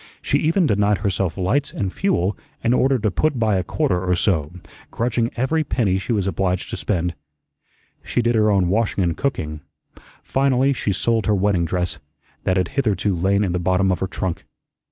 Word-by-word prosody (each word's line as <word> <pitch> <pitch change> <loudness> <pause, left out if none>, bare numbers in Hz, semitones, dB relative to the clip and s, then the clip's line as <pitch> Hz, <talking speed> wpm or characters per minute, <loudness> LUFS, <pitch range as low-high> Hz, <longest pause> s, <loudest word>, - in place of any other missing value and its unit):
She - - 0
even 165 +4 +2
denied 105 -4 +2
herself 95 -2 -1
lights 120 +10 0
and 95 -2 -3
fuel 105 - 0 0.3
in 115 - +3
order 135 +1 +3
to 105 -3 0
put 150 - 0
by 110 -4 +2
a 90 - 0
quarter 90 +1 0
or 90 -1 +1
so, 80 -5 +1 0.4
grudging 115 0 0
every 155 +6 +1
penny 100 -9 0
she 95 - -4
was 105 -5 +1
obliged 95 0 -1
to - - -2
spend. 90 -3 -1 0.9
She 120 - -1
did 120 +1 +2
her 110 -1 +3
own 95 -3 +3
washing 105 0 +1
and 85 -2 0
cooking. 75 - -3 0.6
Finally 135 0 +2
she 105 - -1
sold 115 +4 0
her 105 - +3
wedding 95 -3 +1
dress, 90 +1 -2 0.5
that 95 - +2
had 90 -2 0
hitherto 105 -7 0
lain 100 +4 +2
in 95 - 0
the 90 - -1
bottom 95 +2 +2
of 90 - -1
her 95 - -1
trunk. 95 -2 -4
100 Hz, 190 wpm, -21 LUFS, 90-120 Hz, 0.9 s, in